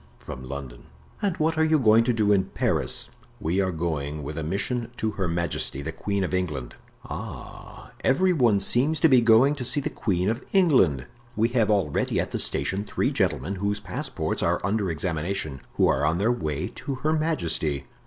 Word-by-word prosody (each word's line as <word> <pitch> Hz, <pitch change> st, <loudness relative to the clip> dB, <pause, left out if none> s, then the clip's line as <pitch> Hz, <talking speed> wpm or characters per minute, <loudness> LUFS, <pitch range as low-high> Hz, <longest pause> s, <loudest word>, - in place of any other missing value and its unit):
"From 65 Hz, -1 st, -9 dB
London." 65 Hz, -4 st, -7 dB, 0.4 s
"And 195 Hz, -4 st, 0 dB
what 160 Hz, +1 st, 0 dB
are -, -, +5 dB
you 160 Hz, 0 st, +4 dB
going 115 Hz, -4 st, +5 dB
to 125 Hz, -, +3 dB
do 110 Hz, -3 st, +2 dB
in 100 Hz, -2 st, +3 dB
Paris?" -, -, -1 dB, 0.3 s
"We 85 Hz, +5 st, 0 dB
are 95 Hz, -1 st, 0 dB
going 75 Hz, -3 st, -3 dB
with 75 Hz, +2 st, -5 dB
a 80 Hz, -, -3 dB
mission 110 Hz, +9 st, -2 dB
to 110 Hz, -, -1 dB
Her 95 Hz, -3 st, -2 dB
Majesty, 85 Hz, -4 st, -2 dB
the 80 Hz, -, -3 dB
Queen 100 Hz, +4 st, -2 dB
of 90 Hz, -, -3 dB
England." 75 Hz, -9 st, -2 dB, 0.3 s
"Ah, -, -, -9 dB
every 180 Hz, +8 st, +3 dB
one 120 Hz, -, +3 dB
seems 135 Hz, +10 st, +3 dB
to -, -, +7 dB
be 130 Hz, -5 st, +5 dB
going 115 Hz, +5 st, +5 dB
to 145 Hz, -4 st, -5 dB
see 130 Hz, +4 st, +1 dB
the 140 Hz, -, -3 dB
queen 95 Hz, -4 st, -1 dB
of 115 Hz, +4 st, -1 dB
England. 125 Hz, -, +4 dB, 0.3 s
We 115 Hz, +1 st, +2 dB
have 115 Hz, -3 st, +1 dB
already 95 Hz, -9 st, +1 dB
at -, -, -2 dB
the -, -, -2 dB
station 95 Hz, +2 st, 0 dB
three 105 Hz, -, -1 dB
gentlemen 95 Hz, +10 st, -1 dB
whose 100 Hz, +1 st, -1 dB
passports 100 Hz, -, -3 dB
are -, -, +1 dB
under 100 Hz, -1 st, 0 dB
examination, 80 Hz, -3 st, -2 dB
who -, -, +4 dB
are 65 Hz, -, +1 dB
on 80 Hz, +3 st, +2 dB
their 105 Hz, +6 st, +2 dB
way 80 Hz, -9 st, -2 dB
to 140 Hz, -, -4 dB
her 155 Hz, -, +3 dB
majesty. 85 Hz, -, 0 dB
100 Hz, 195 wpm, -25 LUFS, 80-120 Hz, 0.4 s, to